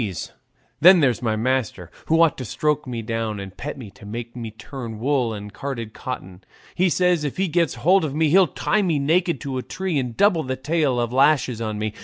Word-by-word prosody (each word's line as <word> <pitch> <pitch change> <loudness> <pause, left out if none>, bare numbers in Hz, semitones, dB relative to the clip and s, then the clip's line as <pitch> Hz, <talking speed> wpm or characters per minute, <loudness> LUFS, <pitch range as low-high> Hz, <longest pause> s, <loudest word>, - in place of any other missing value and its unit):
Then 180 +3 +8
there's 130 -6 +2
my 110 -3 0
master, 110 -7 -1 0.2
who 165 +1 +3
ought 165 - +3
to - - -4
stroke 150 +6 -1
me 120 -2 -4
down 110 -2 -3
and 95 -1 -8
pet 150 +1 -6
me 115 -7 -9
to 125 +1 -18
make 115 +3 -7
me 115 -2 -5
turn 110 +2 -8
wool 125 0 0
and 105 -1 -7
carded 115 -6 -5
cotton; 95 -8 -7 0.3
he 185 +1 +2
says 180 -2 +2
if 145 - -3
he 190 +1 +1
gets 170 -4 +1
hold 180 +10 +3
of 145 -3 -3
me 160 0 +2
he'll 185 +3 +5
tie 210 +8 0
me 170 -6 +1
naked 165 +2 +1
to 135 -2 -3
a - - -3
tree 185 +1 -2
and 125 -3 -4
double 200 -5 +4
the 130 -3 -3
tale 140 -2 0
of 120 0 -1
lashes 130 -4 +3
on 110 -2 -3
me. 105 0 -3
130 Hz, 220 wpm, -22 LUFS, 115-160 Hz, 0.3 s, Then